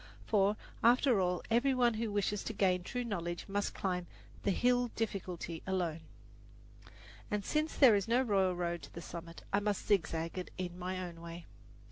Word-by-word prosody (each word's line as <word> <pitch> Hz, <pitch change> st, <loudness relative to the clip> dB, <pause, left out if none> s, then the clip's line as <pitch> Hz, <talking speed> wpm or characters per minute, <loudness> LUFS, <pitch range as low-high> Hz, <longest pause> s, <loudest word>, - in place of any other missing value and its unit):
For, 205 Hz, 0 st, +3 dB, 0.3 s
after 245 Hz, -1 st, +5 dB
all, 180 Hz, -1 st, 0 dB
every 260 Hz, +4 st, +3 dB
one 240 Hz, -2 st, +4 dB
who 220 Hz, 0 st, -2 dB
wishes 205 Hz, 0 st, 0 dB
to 225 Hz, -, -3 dB
gain 185 Hz, -3 st, +2 dB
true 245 Hz, +7 st, -3 dB
knowledge 175 Hz, -6 st, -3 dB
must 205 Hz, 0 st, -1 dB
climb 180 Hz, -2 st, -2 dB, 0.3 s
the -, -, 0 dB
Hill 245 Hz, +5 st, +3 dB
Difficulty 180 Hz, -6 st, -3 dB
alone, 175 Hz, -4 st, 0 dB, 1.3 s
and 205 Hz, -2 st, -1 dB
since 310 Hz, +1 st, 0 dB
there 260 Hz, -6 st, +8 dB
is 200 Hz, -2 st, +1 dB
no 240 Hz, +3 st, +3 dB
royal 195 Hz, -6 st, +2 dB
road 175 Hz, -1 st, -2 dB
to -, -, -11 dB
the -, -, -7 dB
summit, 170 Hz, -1 st, -8 dB
I 200 Hz, -, +4 dB
must 205 Hz, -1 st, -1 dB
zigzag 165 Hz, -3 st, +1 dB
it 180 Hz, -, -6 dB
in 180 Hz, -1 st, -4 dB
my 185 Hz, +1 st, -3 dB
own 165 Hz, -1 st, -10 dB
way. 170 Hz, 0 st, -8 dB
195 Hz, 175 wpm, -34 LUFS, 175-225 Hz, 1.3 s, there